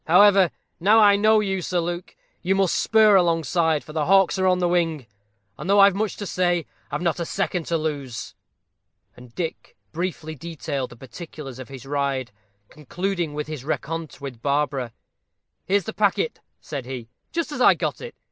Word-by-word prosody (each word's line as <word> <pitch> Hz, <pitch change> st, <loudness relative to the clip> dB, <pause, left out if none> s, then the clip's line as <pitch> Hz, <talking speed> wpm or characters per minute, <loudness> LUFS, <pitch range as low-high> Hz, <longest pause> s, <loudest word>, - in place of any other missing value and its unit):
However, 195 Hz, +1 st, +6 dB, 0.3 s
now 205 Hz, +6 st, +5 dB
I 205 Hz, -2 st, +7 dB
know 215 Hz, +1 st, +4 dB
you, 190 Hz, -2 st, -1 dB
Sir 180 Hz, +1 st, -1 dB
Luke, 175 Hz, +1 st, -4 dB, 0.3 s
you 190 Hz, +2 st, +1 dB
must 195 Hz, -2 st, +2 dB
spur 215 Hz, -2 st, +5 dB
alongside, 165 Hz, -3 st, +2 dB
for 155 Hz, -, -11 dB
the 155 Hz, -2 st, -1 dB
hawks 195 Hz, 0 st, +4 dB
are 190 Hz, -, +3 dB
on 180 Hz, 0 st, +4 dB
the 180 Hz, -1 st, +1 dB
wing; 165 Hz, -6 st, 0 dB, 0.5 s
and 180 Hz, -, -5 dB
though 200 Hz, +1 st, +5 dB
I've 200 Hz, 0 st, +7 dB
much 210 Hz, +2 st, -2 dB
to 205 Hz, -, -5 dB
say, 175 Hz, -3 st, 0 dB, 0.2 s
I've 145 Hz, +4 st, -3 dB
not 170 Hz, -1 st, 0 dB
a 170 Hz, -, -2 dB
second 180 Hz, -2 st, -2 dB
to 170 Hz, -, +1 dB
lose." 145 Hz, -6 st, -4 dB, 0.8 s
And 125 Hz, -1 st, -15 dB
Dick 165 Hz, -3 st, -5 dB
briefly 165 Hz, -2 st, -4 dB
detailed 145 Hz, -3 st, -4 dB
the -, -, -12 dB
particulars 135 Hz, +1 st, -9 dB
of 130 Hz, -, -9 dB
his 135 Hz, -1 st, -10 dB
ride, 135 Hz, -3 st, -1 dB, 0.4 s
concluding 175 Hz, +1 st, -3 dB
with 150 Hz, 0 st, -2 dB
his 155 Hz, -4 st, -7 dB
rencontre 160 Hz, 0 st, -4 dB
with 130 Hz, -5 st, -7 dB
Barbara. 140 Hz, -3 st, 0 dB, 0.8 s
"Here's 200 Hz, +1 st, +2 dB
the 220 Hz, -, -6 dB
packet," 215 Hz, -, +1 dB, 0.2 s
said 140 Hz, -5 st, -6 dB
he, 125 Hz, -3 st, -6 dB, 0.2 s
"just 335 Hz, -2 st, -2 dB
as 290 Hz, -, -4 dB
I -, -, +7 dB
got -, -, -3 dB
it. 480 Hz, 0 st, -8 dB
170 Hz, 180 wpm, -23 LUFS, 145-195 Hz, 0.8 s, I